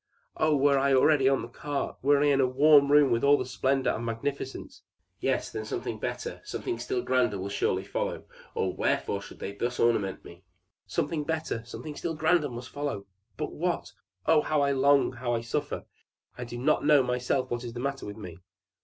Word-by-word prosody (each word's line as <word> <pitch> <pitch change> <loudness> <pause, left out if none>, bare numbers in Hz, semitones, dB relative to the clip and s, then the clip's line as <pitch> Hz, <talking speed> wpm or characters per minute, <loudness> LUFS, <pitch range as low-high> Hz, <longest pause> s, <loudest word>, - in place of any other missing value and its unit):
Oh! 155 -1 +2
were 140 0 +4
I 140 0 +2
but 130 - +6
already 135 -2 +4
on 135 -3 +1
the - - -6
cart! 140 +4 -4
Were 145 +1 +4
I - - +4
in 140 -1 +3
the 130 - +4
warm 140 +2 +5
room 145 -3 +6
with 115 0 +1
all 145 +1 +6
the 130 - -3
splendor 130 +1 0
and 115 - -4
magnificence! 135 - -4 0.4
Yes; - - -1
then - - -4
something - - -4
better, - - -4
something 360 - -4
still 385 -2 -2
grander, 125 -5 +1
will 95 +1 -4
surely 95 -1 0
follow, 100 - -3 0.3
or 95 - 0
wherefore 100 - 0
should - - -11
they 100 - -5
thus 120 +5 -3
ornament 105 -5 +1
me? 85 +2 -13 0.4
Something 155 -3 -1
better, 160 -7 -3
something 150 +5 -8
still 165 +1 -3
grander 155 -1 +2
must 120 +1 -8
follow 145 -9 -4 0.3
but - - -4
what? 175 +2 -2 0.3
Oh, 160 -1 +5
how 155 -1 +1
I 140 0 +2
long, 140 +1 +4
how 120 -1 -2
I 115 - -1
suffer! 115 - -3 0.5
I 125 - -6
do 120 0 -7
not 140 +5 +2
know 145 -2 +5
myself 125 +1 -1
what 120 0 -2
is 120 -1 -6
the 120 - -6
matter 140 0 -3
with 105 +1 -7
me!" 90 -5 -9
135 Hz, 205 wpm, -28 LUFS, 120-145 Hz, 0.5 s, but